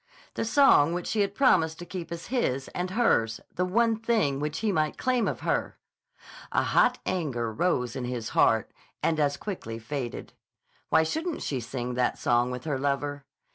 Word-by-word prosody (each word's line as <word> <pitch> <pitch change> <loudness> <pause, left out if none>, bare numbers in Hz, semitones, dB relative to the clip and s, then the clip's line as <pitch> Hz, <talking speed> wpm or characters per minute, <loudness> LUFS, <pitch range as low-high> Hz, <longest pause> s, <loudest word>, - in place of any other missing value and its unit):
The - - -2
song 225 - +5
which 175 - -3
she 220 - -1
had 200 0 -1
promised 165 - +3
to 175 - -8
keep 175 -2 -7
as 170 0 -6
his 135 - 0
and 180 +1 -3
hers; 150 - +2
the 180 - 0
one 225 +4 +2
thing 220 -12 +1
which 150 +1 -2
he 220 -2 +1
might 155 -4 0
claim 255 -2 +1
of - - -3
her!) - - -1 0.7
A - - +2
hot - - +3
anger 130 -11 -2
rose 125 -3 0
in 130 -2 -3
his 120 -3 -4
heart 110 -2 +3 0.3
and 160 -1 +1
as 145 -1 +1
quickly 145 - -5
faded. 120 +1 -5 0.6
Why 160 - +5
shouldn't 320 - -3
she 135 - -2
sing 120 +1 -4
that 125 0 0
song 120 +1 +2
with 125 0 -5
her 145 -4 -2
lover? 145 0 -2
150 Hz, 180 wpm, -27 LUFS, 125-195 Hz, 0.7 s, song